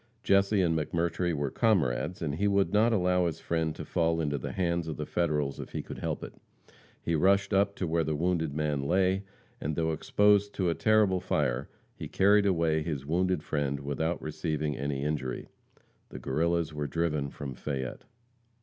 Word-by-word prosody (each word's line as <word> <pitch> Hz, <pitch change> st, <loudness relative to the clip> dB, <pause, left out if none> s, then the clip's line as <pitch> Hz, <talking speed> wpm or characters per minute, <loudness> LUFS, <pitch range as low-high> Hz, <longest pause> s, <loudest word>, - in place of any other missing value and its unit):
Jesse 100 Hz, 0 st, +3 dB
and 80 Hz, -2 st, +2 dB
McMurtry 85 Hz, +2 st, 0 dB
were 70 Hz, -4 st, -2 dB
comrades, 90 Hz, -, +1 dB
and 75 Hz, -3 st, -1 dB
he 100 Hz, +7 st, 0 dB
would 100 Hz, -1 st, +2 dB
not 110 Hz, +3 st, +4 dB
allow 90 Hz, -4 st, +2 dB
his 80 Hz, -1 st, -4 dB
friend 80 Hz, -2 st, -1 dB
to -, -, -7 dB
fall 85 Hz, 0 st, +1 dB
into 75 Hz, -3 st, -1 dB
the -, -, -5 dB
hands 85 Hz, -2 st, 0 dB
of 80 Hz, -, -4 dB
the 75 Hz, -, -3 dB
Federals 75 Hz, -5 st, -1 dB
if -, -, -8 dB
he -, -, -3 dB
could -, -, -8 dB
help -, -, -3 dB
it. -, -, -7 dB, 0.7 s
He 85 Hz, -, -1 dB
rushed 100 Hz, +5 st, +3 dB
up 100 Hz, +1 st, +2 dB
to 90 Hz, -, -2 dB
where 80 Hz, 0 st, +1 dB
the 75 Hz, 0 st, -1 dB
wounded 80 Hz, -1 st, 0 dB
man 75 Hz, -1 st, -1 dB
lay, 95 Hz, +6 st, +1 dB, 0.4 s
and 75 Hz, +1 st, -2 dB
though 80 Hz, 0 st, 0 dB
exposed 105 Hz, +5 st, +2 dB
to 90 Hz, -3 st, +1 dB
a -, -, +1 dB
terrible 105 Hz, -1 st, +3 dB
fire, 65 Hz, -9 st, -1 dB, 0.3 s
he -, -, -6 dB
carried 100 Hz, +1 st, +4 dB
away 80 Hz, -4 st, +2 dB
his 75 Hz, -4 st, -4 dB
wounded 90 Hz, +1 st, 0 dB
friend 70 Hz, -2 st, -1 dB
without 80 Hz, +4 st, -2 dB
receiving 75 Hz, -1 st, -2 dB
any 70 Hz, 0 st, -2 dB
injury. 70 Hz, -4 st, -3 dB, 0.6 s
The -, -, -8 dB
Guerrillas 85 Hz, +3 st, 0 dB
were 75 Hz, -1 st, -3 dB
driven 75 Hz, -4 st, -1 dB
from 70 Hz, -1 st, -6 dB
Fayette. 65 Hz, 0 st, -5 dB
80 Hz, 185 wpm, -29 LUFS, 75-95 Hz, 0.7 s, not